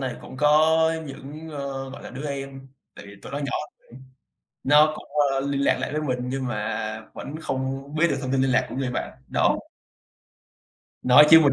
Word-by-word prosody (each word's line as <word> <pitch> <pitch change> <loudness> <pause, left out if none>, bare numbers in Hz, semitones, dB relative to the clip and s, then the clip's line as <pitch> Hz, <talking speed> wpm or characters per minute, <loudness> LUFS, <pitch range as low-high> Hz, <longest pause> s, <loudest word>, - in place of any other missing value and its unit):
này 130 -2 -3
cũng 130 - -11
có 155 +3 +4 0.3
những, 145 +4 -9
ơ, 140 -2 -5
gọi - - -10
là, - - -8
đứa 135 +4 -6
em, 135 -1 -6 0.3
tại - - -11
vì 100 - -12
tụi - - -9
nó 140 - -2
nhỏ 140 -1 -3 0.3
hơn, 130 +2 -15 0.6
nó 150 +2 +6
cũng, - - -10 0.3
ơ, 135 - 0
liên 140 0 -1
lạc 140 - +3
lại - - -3
với 155 - -1
mình 130 -4 -1
nhưng 130 0 -2
mà 110 0 -3
vẫn 155 +4 -7
không 135 +2 -3
biết 170 +2 +3
được - - 0
thông 130 -1 -3
tin 135 -1 +2
liên 135 - +2
lạc 130 0 +3
của - - -7
người 130 -2 -1
bạn - - -4
đó. - - +3 1.4
Nói 135 +4 +8
chứ 160 0 +10
mình 145 -3 +4
135 Hz, 210 wpm, -24 LUFS, 130-150 Hz, 1.4 s, chứ